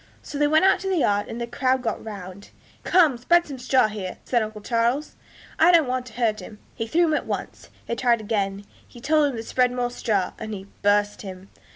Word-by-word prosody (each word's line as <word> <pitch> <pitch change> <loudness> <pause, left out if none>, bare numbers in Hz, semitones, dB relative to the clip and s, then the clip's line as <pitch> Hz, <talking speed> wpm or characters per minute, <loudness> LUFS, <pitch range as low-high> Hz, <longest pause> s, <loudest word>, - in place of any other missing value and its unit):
So 285 - -6
they 295 - +4
went 315 +4 +4
out 385 - +4
to 385 - -4
the 375 - +1
yard, 205 -8 +1
and 230 - -6
a - - -2
crowd 255 +2 0
got 225 -3 -3
round. 200 -2 -9 0.3
'Come, 315 -9 +4
spread 345 +7 +3
some 275 -3 -8
straw 255 -1 +3
here,' 200 -4 -6
said 240 -2 +1
uncle 215 -1 -5
Charles, 235 +6 0 0.4
'I 340 +3 +6
don't 325 -5 +5
want 255 0 -2
to 230 - -12
hurt 225 -3 0
him.' 210 +3 -10 0.2
He 225 - -4
threw 340 +9 +2
him 315 - +1
at - - -1
once. - - -5 0.2
They - - -3
tried 235 -1 +2
again; 200 -2 -2 0.2
he 240 - -14
told 300 +3 +3
them 255 - -5
to 225 - -5
spread 250 +2 +1
more 245 -1 -2
straw, 205 -6 -1
and 220 -1 -5
he 195 -1 -9 0.2
'burst' 205 0 +2
him. 190 -1 -9
235 Hz, 230 wpm, -24 LUFS, 210-275 Hz, 0.4 s, I